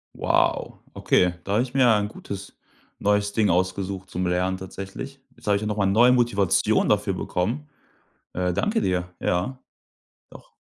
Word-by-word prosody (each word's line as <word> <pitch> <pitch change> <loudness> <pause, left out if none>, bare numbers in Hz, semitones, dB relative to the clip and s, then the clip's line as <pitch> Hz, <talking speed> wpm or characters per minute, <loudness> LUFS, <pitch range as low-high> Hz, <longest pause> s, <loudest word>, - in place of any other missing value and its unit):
Wow, - - +1 0.2
okay, 90 -1 +2
da 100 - -3
habe 115 +4 +3
ich 130 0 -8
mir 130 -3 +4
ein 105 -1 +2
gutes 100 -1 -8 0.4
neues 105 0 +1
Ding 105 -3 +2
ausgesucht 95 +1 -1
zum 90 0 -1
Lernen 90 +1 0
tatsächlich. 95 +8 -8 0.2
Jetzt - - -17
habe 105 - +4
ich 100 - -1
ja 105 - -3
noch 105 0 -2
mal 100 -2 +2
neue 115 +6 +5
Motivation 115 -7 +2
dafür 105 -2 +1
bekommen. 115 +12 -2 0.7
Äh. 90 0 0
Danke 215 - 0
dir. 90 -1 -1
Ja. 95 +10 -1 0.7
Doch. - - -15
100 Hz, 165 wpm, -24 LUFS, 95-110 Hz, 0.7 s, neue